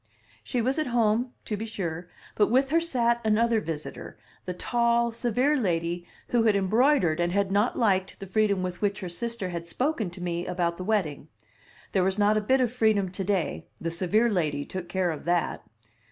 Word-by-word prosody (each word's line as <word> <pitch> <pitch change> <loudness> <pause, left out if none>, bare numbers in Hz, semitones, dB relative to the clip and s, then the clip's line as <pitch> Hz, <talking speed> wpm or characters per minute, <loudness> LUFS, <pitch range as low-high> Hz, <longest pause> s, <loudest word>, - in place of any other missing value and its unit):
She 245 -3 -1
was 265 +5 0
at 310 - 0
home, 240 0 +1
to 215 - -2
be 220 +2 -5
sure, 175 -5 -4 0.2
but 210 - +2
with 265 +4 +2
her 330 - +5
sat 235 -8 +1
another 225 +1 +2
visitor, 160 -5 -6 0.3
the 180 - -3
tall, 235 +3 +1
severe 245 +5 +1
lady 175 - -1 0.2
who 240 - +3
had 215 -2 +4
embroidered 200 - +3
and 175 0 +1
had 200 0 +1
not 205 +4 +2
liked 190 -5 +1
the 195 - -6
freedom 200 -1 +1
with 180 -1 -4
which 205 0 0
her 185 - -4
sister 230 +1 -3
had 170 -1 -5
spoken 250 - -1
to 175 - -11
me 175 -1 -3
about 170 -1 -1
the 185 - -5
wedding. 180 -9 -1 0.6
There 190 - +2
was 190 +1 0
not 210 +1 +3
a 215 - +2
bit 260 +5 +2
of 245 -2 0
freedom 215 -6 +2
to 190 +1 -4
day; 190 -3 -1
the 165 - -3
severe 190 +7 +2
lady 150 -7 0
took 185 -2 -6
care 185 -2 0
of 155 - -7
that. 175 -1 0
205 Hz, 195 wpm, -27 LUFS, 175-235 Hz, 0.6 s, her